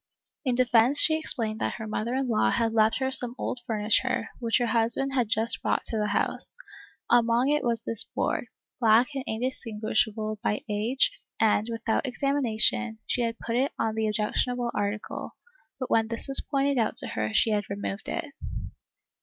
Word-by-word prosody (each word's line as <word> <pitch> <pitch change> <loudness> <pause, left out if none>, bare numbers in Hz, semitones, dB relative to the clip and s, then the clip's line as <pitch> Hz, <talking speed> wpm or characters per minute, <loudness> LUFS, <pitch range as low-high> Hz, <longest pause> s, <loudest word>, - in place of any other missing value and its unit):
In 255 -4 0
defence 245 +2 +4
she 315 - +6
explained 225 -8 +1
that - - -1
her 220 - -6
mother 220 +3 -3
in 265 0 -1
law 220 -3 +2
had 230 -1 0
left 220 -1 +3
her 265 0 -1
some 245 -2 0
old 250 - -3
furni 210 -1 0
ture, 260 - -2
which 230 -2 +1
her 245 - 0
husband 235 +4 0
had 245 -5 0
just 225 +1 +4
brought - - 0
to 225 - 0
the 210 - 0
house; 205 - +1 0.5
among 240 +2 +3
it 295 0 +1
was 230 -2 -1
this 230 - 0
board, - - -2 0.3
black 230 +1 +4
and 270 -1 -4
indistinguishable 220 -2 -2
with 210 - 0
age 225 - +1 0.3
and, 215 0 +2
without 230 +3 -1
examination, 240 -4 +1
she 245 - -1
had 230 -1 -2
put 230 - -4
it 265 +3 0
on 225 -1 -1
the 220 0 -1
objectionable 235 +3 -1
article, 205 +1 -4 0.4
but 255 - -5
when 225 -1 +3
this 230 +4 -2
was 275 - +6
pointed 275 -1 0
out 225 - 0
to - - +4
her 110 0 -2
she 220 - +2
had 205 -1 -1
removed 200 +1 -5
it. 340 - -3
230 Hz, 180 wpm, -27 LUFS, 220-255 Hz, 0.5 s, she